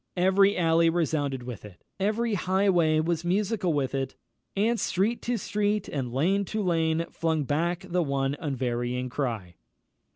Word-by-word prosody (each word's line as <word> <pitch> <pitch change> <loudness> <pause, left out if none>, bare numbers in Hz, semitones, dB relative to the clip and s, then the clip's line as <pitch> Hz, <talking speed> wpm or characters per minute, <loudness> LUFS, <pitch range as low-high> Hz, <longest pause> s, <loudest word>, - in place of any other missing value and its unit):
Every 190 +2 +4
alley 165 -1 +4
resounded 145 -6 -1
with 120 -4 -7
it; 100 -4 -13 0.2
every 215 +3 0
highway 185 -4 +2
was 165 0 -1
musical 190 +1 0
with 140 -4 -1
it, 135 -1 -2 0.4
"And 225 +3 +2
street 210 +6 0
to 245 0 -1
street, 210 0 -1
and 130 -4 -3
lane 180 +10 +2
to 215 +2 -2
lane 165 -2 +1
flung 160 -2 0
back 170 +6 -1
The 180 0 +1
one 140 -2 0
unvarying 125 -3 -2
cry." 115 - -3
165 Hz, 150 wpm, -27 LUFS, 135-195 Hz, 0.4 s, Every